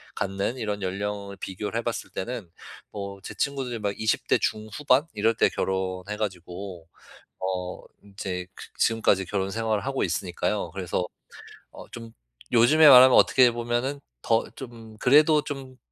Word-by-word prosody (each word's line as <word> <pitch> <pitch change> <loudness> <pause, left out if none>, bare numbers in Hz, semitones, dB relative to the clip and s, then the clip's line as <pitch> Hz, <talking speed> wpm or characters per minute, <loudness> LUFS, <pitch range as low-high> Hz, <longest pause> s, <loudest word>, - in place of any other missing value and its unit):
갖는 100 +5 -2
이런 105 -3 -3
연령을 100 +1 -4
비교를 105 +4 -5
해 - - -4
봤을 120 0 -4
때는 110 -2 -5 0.4
뭐 100 -1 -6
제 - - -7
친구들이 135 -4 -2
막 100 -1 -2
20 110 0 0
대 - - +4
중후반 125 +6 +1
이럴 110 +2 +1
때 - - +3
결혼해 95 +1 -3
가지고 90 -3 -6 0.5
어 90 -1 -4 0.2
이제 95 -3 -5
그 - - -10
지금까지 105 -4 +2
결혼 95 0 -2
생활을 110 +1 -1
하고 135 0 -1
있으니까요. 90 +2 -2
그래서 90 -1 -2 0.7
어 - - -11
좀 115 -1 -9 0.7
요즘에 160 -1 +8
말하면 130 -2 +9
어떻게 125 -2 +6
보면은 120 +4 -2 0.2
더 115 0 +1
좀 115 -4 -11
그래도 150 +3 +5
좀 135 -3 -7
105 Hz, 295 characters per minute, -26 LUFS, 95-120 Hz, 0.7 s, 말하면